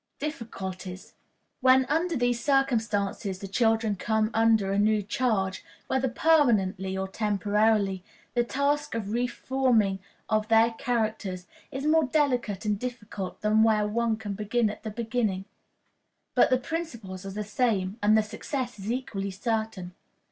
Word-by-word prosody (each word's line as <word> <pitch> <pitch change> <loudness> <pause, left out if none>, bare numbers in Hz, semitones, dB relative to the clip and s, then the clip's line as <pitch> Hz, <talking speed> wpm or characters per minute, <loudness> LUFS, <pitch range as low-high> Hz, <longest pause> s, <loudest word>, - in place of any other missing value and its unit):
Difficulties. 190 - -6 0.5
When 260 0 +5
under 325 +5 0
these 245 -1 0
circumstances 220 -8 0
the 195 - -7
children 225 +1 +2
come 220 +3 0
under 220 -3 +3
a 200 - +1
new 210 0 +3
charge, 195 -4 -1 0.2
whether 265 0 0
permanently 215 - +2
or 190 0 -2
temporarily, 205 -1 +1 0.3
the 240 - +2
task 280 +2 0
of 210 -3 -3
re 240 +2 +1
form 260 -2 +1
in 195 -1 -2 0.3
or 215 -1 +2
their 225 +1 +4
characters 220 -6 -2 0.3
is 270 +2 -4
more 315 0 +4
delicate 250 -8 0
and 210 -1 0
difficult 215 -6 -6
than 215 +1 +3
where 215 -2 +3
one 225 +1 0
can 210 -2 -5
begin 215 +2 0
at 210 - -10
the 220 - -5
beginning; 215 -3 -2 0.9
but - - +5
the 255 - +4
principles 235 - -5
are 195 - -6
the 210 +2 -4
same, 210 -2 0
and 210 +1 +5
the 220 - +3
success 245 +2 -5
is 200 +3 -3
equally 210 -6 -3
certain. 215 -2 -3
220 Hz, 150 wpm, -27 LUFS, 200-245 Hz, 0.9 s, When